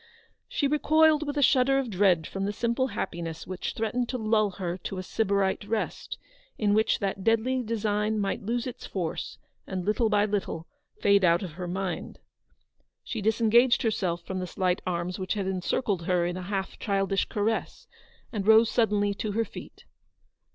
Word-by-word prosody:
She 405 Hz, -, +1 dB
recoiled 305 Hz, +1 st, +3 dB
with 290 Hz, 0 st, -3 dB
a 285 Hz, -, +3 dB
shudder 270 Hz, +1 st, +4 dB
of 265 Hz, -4 st, -1 dB
dread 185 Hz, -4 st, +3 dB
from 195 Hz, 0 st, -3 dB
the 205 Hz, -, -1 dB
simple 235 Hz, +4 st, 0 dB
happiness 170 Hz, -7 st, -5 dB
which 185 Hz, -1 st, -4 dB
threatened 235 Hz, +2 st, -1 dB
to 255 Hz, -, -2 dB
lull 215 Hz, -2 st, +2 dB
her 180 Hz, -2 st, -4 dB
to 190 Hz, -, -5 dB
a 185 Hz, -, -4 dB
Sybarite 200 Hz, -1 st, 0 dB
rest; 215 Hz, +1 st, -3 dB, 0.4 s
in 205 Hz, -2 st, +2 dB
which 220 Hz, +1 st, +3 dB
that 195 Hz, -1 st, -3 dB
deadly 230 Hz, +4 st, +2 dB
design 215 Hz, -2 st, -1 dB
might 200 Hz, -2 st, -1 dB
lose 235 Hz, +3 st, -2 dB
its 250 Hz, -1 st, -7 dB
force, 175 Hz, -5 st, -4 dB, 0.3 s
and, 185 Hz, -2 st, -4 dB
little 215 Hz, +2 st, +2 dB
by 210 Hz, -1 st, +3 dB
little, 200 Hz, -6 st, -2 dB, 0.3 s
fade 200 Hz, -1 st, +4 dB
out 170 Hz, +1 st, +4 dB
of 180 Hz, -, -5 dB
her 175 Hz, +3 st, -6 dB
mind. 185 Hz, 0 st, -4 dB, 0.9 s
She 225 Hz, -, -4 dB
disengaged 230 Hz, +3 st, +4 dB
herself 180 Hz, -6 st, -1 dB
from 190 Hz, -1 st, -4 dB
the 180 Hz, -, -3 dB
slight 180 Hz, 0 st, 0 dB
arms 180 Hz, +1 st, -2 dB
which 185 Hz, +2 st, -2 dB
had 200 Hz, -2 st, -2 dB
encircled 190 Hz, 0 st, -1 dB
her 180 Hz, -2 st, +2 dB
in 175 Hz, 0 st, -2 dB
a 185 Hz, -, -5 dB
half 195 Hz, -2 st, -3 dB
childish 195 Hz, -1 st, 0 dB
caress, 215 Hz, +1 st, -2 dB, 0.5 s
and 205 Hz, -2 st, -3 dB
rose 220 Hz, +1 st, +6 dB
suddenly 205 Hz, -3 st, +2 dB
to 205 Hz, +1 st, -4 dB
her 225 Hz, +2 st, +1 dB
feet. -, -, -11 dB
205 Hz, 175 wpm, -27 LUFS, 185-230 Hz, 0.9 s, rose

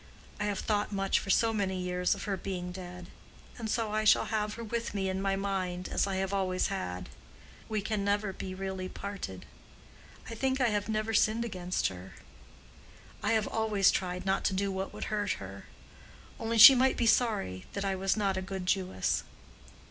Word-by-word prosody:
I 210 Hz, -, 0 dB
have 205 Hz, -1 st, -1 dB
thought 210 Hz, -1 st, 0 dB
much 195 Hz, -1 st, +1 dB
for -, -, -8 dB
so 225 Hz, +3 st, +3 dB
many 190 Hz, -3 st, -1 dB
years 180 Hz, +1 st, 0 dB
of 200 Hz, -, -7 dB
her 200 Hz, -2 st, -1 dB
being 180 Hz, -2 st, -4 dB
dead. 180 Hz, -1 st, -8 dB, 0.5 s
And 220 Hz, -2 st, -3 dB
I 215 Hz, -1 st, -1 dB
shall 215 Hz, -, +5 dB
have 210 Hz, -1 st, -1 dB
her 230 Hz, -, -7 dB
with 230 Hz, -1 st, -3 dB
me 190 Hz, -1 st, 0 dB
in 190 Hz, 0 st, -2 dB
my 195 Hz, 0 st, +1 dB
mind, 185 Hz, -2 st, -2 dB
as -, -, +1 dB
I 195 Hz, -, -2 dB
have 190 Hz, +1 st, -1 dB
always 185 Hz, -2 st, 0 dB
had. 90 Hz, -, -4 dB, 0.6 s
We 215 Hz, -2 st, -1 dB
can 215 Hz, -1 st, -1 dB
never 200 Hz, 0 st, 0 dB
be 185 Hz, 0 st, -6 dB
really 190 Hz, -1 st, -4 dB
parted. 195 Hz, -, -6 dB, 0.8 s
I -, -, -6 dB
think 265 Hz, +3 st, 0 dB
I 245 Hz, -3 st, +3 dB
have 210 Hz, 0 st, -1 dB
never 215 Hz, +1 st, -1 dB
sinned 220 Hz, +2 st, +3 dB
against 185 Hz, -4 st, -1 dB
her. 95 Hz, 0 st, -10 dB, 1.1 s
I -, -, +1 dB
have 220 Hz, -1 st, +2 dB
always 215 Hz, -3 st, +3 dB
tried 180 Hz, 0 st, -2 dB
not 195 Hz, 0 st, +1 dB
to 190 Hz, -, +1 dB
do 200 Hz, +1 st, 0 dB
what 190 Hz, 0 st, -3 dB
would -, -, -6 dB
hurt 205 Hz, -1 st, 0 dB
her. -, -, -9 dB, 0.7 s
Only, 230 Hz, 0 st, -1 dB
she 235 Hz, +5 st, +12 dB
might 260 Hz, +1 st, +3 dB
be 240 Hz, -, +1 dB
sorry 210 Hz, -, +1 dB
that 200 Hz, 0 st, -2 dB
I 195 Hz, -, +1 dB
was 190 Hz, +2 st, 0 dB
not 195 Hz, -2 st, +1 dB
a -, -, -1 dB
good 190 Hz, -1 st, -5 dB
Jewess." 185 Hz, 0 st, 0 dB
195 Hz, 195 wpm, -30 LUFS, 185-215 Hz, 1.1 s, she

